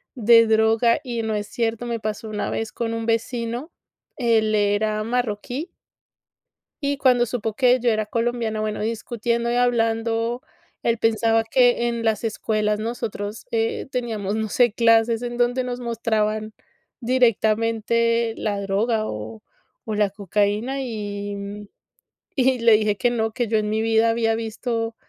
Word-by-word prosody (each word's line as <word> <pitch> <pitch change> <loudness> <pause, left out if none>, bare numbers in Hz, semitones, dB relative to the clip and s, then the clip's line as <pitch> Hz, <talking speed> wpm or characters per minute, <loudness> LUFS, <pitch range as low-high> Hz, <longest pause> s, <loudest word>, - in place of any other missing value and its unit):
de 230 -1 +6
droga 220 +1 +3
y 240 -3 -3
no 220 -1 -2
es 205 0 -2
cierto. 230 +1 -2
Me 235 -1 -3
pasó 215 +1 -4
una 210 -1 -3
vez 225 -1 -3
con 230 -1 -3
un 225 0 -3
vecino, 235 +5 -2 0.5
él 225 -3 +2
era 210 +1 +1
marroquí 245 - -3 1.1
y 280 0 0
cuando 250 -3 +4
supo 225 -2 -3
que 255 0 +4
yo 245 0 +1
era 215 -1 +1
colombiana, 230 0 -1
bueno, 215 -1 -2
discutiendo 235 +1 -2
y - - 0
hablando, 230 0 +1 0.4
él 235 0 +1
pensaba 225 0 +2
que 240 +1 +3
en 235 -1 -2
las 220 0 0
escuelas 215 -1 -1
nosotros, 220 -2 -4
eh, 225 0 -1
teníamos, 220 -5 -2
no 220 -1 -2
sé, 240 0 +3
clases 230 0 +3
en 240 0 -4
donde 245 +1 +1
nos 250 0 -4
mostraban 220 -2 -1 0.5
directamente 230 -1 +1
la 205 -2 -2
droga 215 +3 0
o 110 +1 -6 0.5
o 220 - -2
la 210 -1 +2
cocaína. 205 +6 -1
Y, 205 -4 -4
mm, 200 +1 -7 0.7
y 260 -2 +2
le 230 -1 +5
dije 215 -1 +2
que 245 - +2
no, 225 -2 -1
que 240 +2 -2
yo 220 0 +1
en 210 -1 -1
mi 215 +1 0
vida 225 0 +3
había 225 -1 +1
visto 225 0 -3
225 Hz, 155 wpm, -23 LUFS, 215-240 Hz, 1.1 s, de